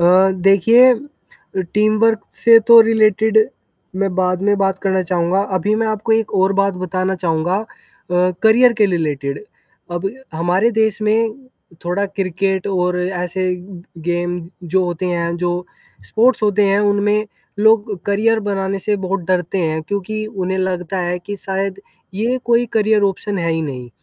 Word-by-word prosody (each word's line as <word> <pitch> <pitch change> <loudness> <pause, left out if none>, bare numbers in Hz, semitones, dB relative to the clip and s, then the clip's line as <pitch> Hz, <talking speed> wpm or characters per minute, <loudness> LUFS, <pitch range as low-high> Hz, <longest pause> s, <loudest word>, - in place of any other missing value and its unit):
अ, 185 +2 +5
देखिए 200 +7 +5 0.8
टीमवर्क 215 +1 +2 0.2
से 230 -1 +8
तो 235 -1 +10
रिलेटेड 220 -1 +3 0.6
मैं 195 -2 -1
बाद 185 -1 0
में 205 0 +2
बात 195 -1 0
करना 190 -1 +1
चाहूँगा। 175 +1 0 0.2
अभी 205 +5 0
मैं 225 0 0
आपको 215 +1 -1
एक 220 -1 0
और 190 0 +2
बात 195 -1 0
बताना 185 +1 -2
चाहूँगा। 175 +1 -1
अ, 220 - -9 0.8
करियर 235 +3 +5
के 210 - +5
लिए 180 - 0
रिलेटेड 145 +1 -3 0.5
अब 185 +3 -2 0.2
हमारे 175 +7 +1
देश 220 -1 +1
में 220 +1 +1 0.5
थोड़ा 180 +4 -1
क्रिकेट 190 0 -2
और 180 -2 0
ऐसे 180 0 -2 0.6
गेम 175 0 -1 0.3
जो 190 - +3
होते 175 +1 -3
हैं 170 -1 -2
जो 175 0 -2 0.4
स्पोर्ट्स 235 +1 +2
होते 205 0 +2
हैं 195 +1 +2
उनमें 205 +1 +1 0.3
लोग 215 -2 +2
करियर 220 +3 +2
बनाने 195 -1 -2
से 205 +2 -1
बहुत 195 +1 -1
डरते 180 +1 0
हैं 160 -1 -1
क्योंकि 205 +4 -4
उन्हें 190 -3 -3
लगता 185 0 -2
है 175 0 -2
कि 205 +3 -7
शायद 195 0 -4 0.3
ये 235 +5 -1
कोई 240 0 +2
करियर 215 -1 +2
ऑप्शन 200 0 -2
है 170 -1 -1
ही 160 0 -1
नहीं। 125 -5 -6
195 Hz, 155 wpm, -18 LUFS, 180-215 Hz, 0.8 s, तो